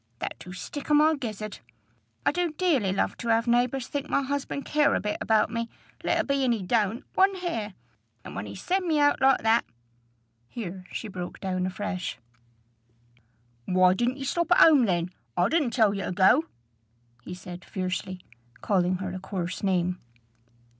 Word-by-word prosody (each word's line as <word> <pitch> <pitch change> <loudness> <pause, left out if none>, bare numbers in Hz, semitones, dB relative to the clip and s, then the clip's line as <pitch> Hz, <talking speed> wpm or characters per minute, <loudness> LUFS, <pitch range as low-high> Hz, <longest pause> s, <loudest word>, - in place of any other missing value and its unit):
that - - -4
do 180 - -10
stick 280 +11 -7
i' 300 - +5
my 305 +2 +5
gizzard. 215 -7 -5 0.7
I - - +4
do 350 +1 -1
dearly 300 - +1
love 195 - 0
to 235 - -6
have 230 0 +3
neighbors 245 +2 +1
think 285 +2 -4
my 280 - +2
husband 280 0 -3
care 300 -1 +3
a - - +1
bit 210 0 -2
about 220 -1 +2
me, 230 0 -3 0.3
let - - +1
a - - +2
be 275 -1 0
'at 255 - +3
he 225 -5 -1
don't, 220 +4 0
one 385 +1 +4
hair; 230 - -4 0.5
and - - -8
when 100 - -4
he 100 - -8
send 370 0 -1
me 310 -2 +2
out 290 0 +3
like 265 -2 +4
that" 225 +1 +4 0.8
Here 185 - -7
she 225 - -5
broke 180 -3 -7
down 185 -1 -1
afresh. 185 -1 -4 1.5
"Why 185 0 +4
didn't 240 +6 0
ye 275 - -5
stop 340 +6 -1
at 355 - +7
home 295 -7 +7
then? 175 -3 0 0.3
I 180 +3 +3
didn't 310 -4 +2
tell 220 -4 +3
ye 195 - -3
to - - -3
go," 195 - +4 0.8
he 180 - -7
said 180 0 -9
fiercely, 185 0 -4 0.4
calling 185 -2 +2
her 185 0 -4
a 185 - -5
coarse 180 -2 -4
name. 180 -2 0
220 Hz, 180 wpm, -27 LUFS, 185-280 Hz, 1.5 s, at